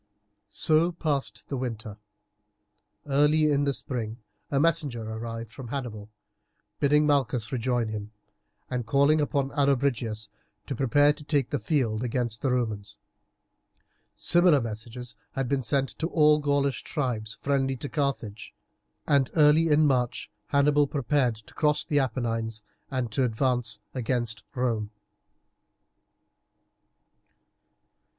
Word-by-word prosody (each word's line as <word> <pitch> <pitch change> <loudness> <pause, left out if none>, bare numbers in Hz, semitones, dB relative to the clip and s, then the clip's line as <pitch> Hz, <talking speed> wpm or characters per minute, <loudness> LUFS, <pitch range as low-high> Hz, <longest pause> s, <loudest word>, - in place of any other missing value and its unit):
So 160 +2 +2
passed 140 -10 -2
the 140 - -3
winter. 110 -4 -5 1.1
Early 150 +2 +3
in 145 0 +2
the 140 - +2
spring 115 -4 -3 0.3
a 140 - +1
messenger 150 -7 +1
arrived 115 0 -6
from 130 -1 -9
Hannibal 115 -5 -5 0.7
bidding 150 +1 +4
Malchus 130 -6 +1
rejoin 120 -2 0
him, 105 -1 -6 0.6
and 125 -3 -3
calling 140 +5 +4
upon 140 -2 0
Allobrigius 125 -6 0 0.4
to 140 - -4
prepare 145 +4 +4
to 150 0 -13
take 145 -3 0
the 145 - 0
field 120 -8 0
against 120 -2 -2
the 135 - +1
Romans. 110 -5 -2 1.2
Similar 175 -4 +4
messages 115 +1 -6 0.2
had 135 -2 -2
been 140 +1 0
sent 135 +2 +1
to 165 - 0
all 150 -3 +4
the 150 - -9
Gaulish 140 -2 +1
tribes 110 -7 -3
friendly 135 -1 0
to 145 - -5
Carthage, 120 -8 -3 0.5
and 140 -4 +3
early 155 +1 +5
in 155 0 +4
March 125 -4 0 0.2
Hannibal 145 0 +3
prepared 140 -3 +1
to 110 -1 -16
cross 150 -1 +2
the 145 -3 +1
Apennines 115 -4 -2 0.3
and 130 -4 -2
to 130 - +1
advance 120 -2 0
against 120 -3 -1
Rome. 115 -5 -1
130 Hz, 125 wpm, -27 LUFS, 115-145 Hz, 1.2 s, early